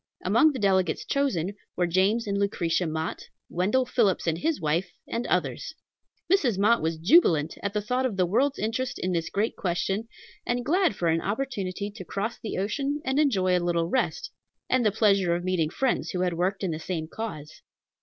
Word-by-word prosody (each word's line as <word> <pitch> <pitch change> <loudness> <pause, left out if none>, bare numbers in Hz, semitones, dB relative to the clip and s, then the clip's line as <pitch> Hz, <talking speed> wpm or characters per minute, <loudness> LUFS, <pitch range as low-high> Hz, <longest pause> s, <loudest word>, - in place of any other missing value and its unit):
Among 315 -2 +5
the 275 - -5
delegates 190 -6 +1
chosen 205 - 0 0.2
were 175 - +1
James 190 +6 +2
and 200 -1 -2
Lucretia 180 -4 0
Mott, 160 +1 -4 0.2
Wendell 210 +9 +1
Phillips 225 -7 +1
and 165 -1 0
his 320 - 0
wife, 160 +4 0 0.2
and 235 +1 -3
others. 175 - -1 0.5
Mrs. 280 - +2
Mott 215 +4 +3
was 160 0 -1
jubilant 165 - +4
at 200 -1 -3
the 210 -1 -1
thought 250 +4 0
of 210 -6 -6
the 185 - +3
world's 260 +10 +1
interest 230 +4 -2
in 185 - -2
this 165 -2 -1
great 215 +3 -1
question, 195 +4 -1 0.4
and 245 0 -2
glad 355 - +2
for 175 - -1
an 165 +1 +1
opportunity 205 -4 -3
to 205 -2 -9
cross 205 +6 -4
the 220 - -5
ocean 275 +9 -1
and 265 +2 +1
enjoy 190 -11 +3
a 180 - +1
little 170 -1 0
rest, 465 - -1 0.4
and 255 -1 +3
the 210 - +3
pleasure 195 -5 +3
of 175 - -3
meeting 180 -4 0
friends 260 +9 -1
who 180 - -2
had 180 -1 +1
worked 185 +4 -1
in 185 - 0
the 155 - -4
same 165 -2 -4
cause. 160 -7 -7
195 Hz, 195 wpm, -26 LUFS, 175-240 Hz, 0.5 s, Among